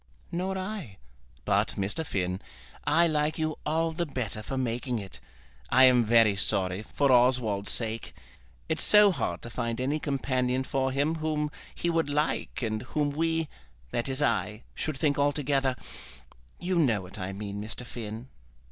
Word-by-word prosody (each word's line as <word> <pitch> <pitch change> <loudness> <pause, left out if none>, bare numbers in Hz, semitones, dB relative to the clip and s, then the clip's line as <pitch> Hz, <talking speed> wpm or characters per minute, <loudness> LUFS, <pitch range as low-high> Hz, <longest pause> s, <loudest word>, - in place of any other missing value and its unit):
"Nor 185 +2 -2
I; 185 - -5 0.5
but, - - +1
Mr. 100 +11 -1
Finn, 90 - -2 0.4
I 165 +3 +4
like 155 -1 +1
you 155 -1 -2
all 165 +2 +1
the 170 +1 -2
better 120 -6 -3
for 135 +5 -4
making 125 0 -1
it. 100 -3 -7 0.5
I 130 +1 +6
am 125 -2 +7
very 115 -2 +5
sorry, 95 0 0
for 140 +5 +1
Oswald's 120 -5 +3
sake. 115 -1 -1 0.5
It's - - 0
so 210 -1 +7
hard 180 - -3
to 120 - -7
find 115 -1 -2
any 140 +4 0
companion 130 -3 0
for 130 0 0
him 145 +5 +1
whom 155 -1 -1 0.2
he 170 - 0
would 165 -3 +1
like 150 -2 -1
and 110 -1 -1
whom 145 +3 -1
we, 160 +1 0 0.4
that 120 +3 -1
is 135 +2 +1
I, 105 -6 0
should 155 -3 -3
think 145 0 +1
altogether; 140 -2 +1 0.8
you 180 0 0
know 115 - +3
what 90 - -10
I 95 +1 -3
mean, 100 +1 -5
Mr. 110 +3 -5
Finn." 115 0 -7
130 Hz, 160 wpm, -28 LUFS, 115-155 Hz, 0.8 s, am